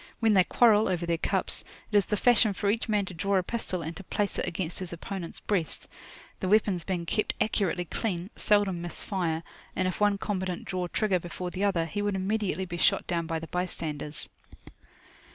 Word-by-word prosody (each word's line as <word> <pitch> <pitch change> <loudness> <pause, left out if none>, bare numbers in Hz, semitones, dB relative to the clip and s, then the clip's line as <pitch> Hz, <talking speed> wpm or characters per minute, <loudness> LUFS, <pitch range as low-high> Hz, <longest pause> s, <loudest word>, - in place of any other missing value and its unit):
When 225 -2 +4
they 190 -2 +6
quarrel 220 +1 +5
over 175 -2 0
their 170 -1 0
cups, - - +1 0.3
it - - -2
is 200 -2 +5
the 210 - 0
fashion 225 -2 +4
for 200 +1 +1
each 225 +1 -2
man 210 -2 +2
to 180 - -7
draw 195 +4 0
a 185 - +2
pistol, 185 -4 -2
and 160 +2 -5
to 195 - -8
place 205 +2 -1
it - - -1
against 175 -1 -2
his 185 -2 -5
opponent's 175 0 -5
breast. 180 -7 -1 0.5
The 185 - -2
weapons 200 -3 +3
being 175 -2 -2
kept 215 +5 0
accurately 195 -5 +1
clean, 180 +1 -3
seldom 205 -4 +2
miss 175 0 -4
fire, 170 -4 -1 0.3
and 185 - +1
if 185 - -3
one 205 -1 +4
combatant 185 -3 -3
draw 185 -2 -2
trigger 195 0 +1
before 175 +1 -5
the 190 +2 -2
other, 175 -5 +2
he 205 +5 -3
would 205 -1 0
immediately 190 -2 0
be 175 -1 -5
shot - - +3
down 170 -2 -1
by 165 -1 -1
the 165 - -5
bystanders. 160 -4 -3
185 Hz, 205 wpm, -28 LUFS, 170-205 Hz, 0.5 s, they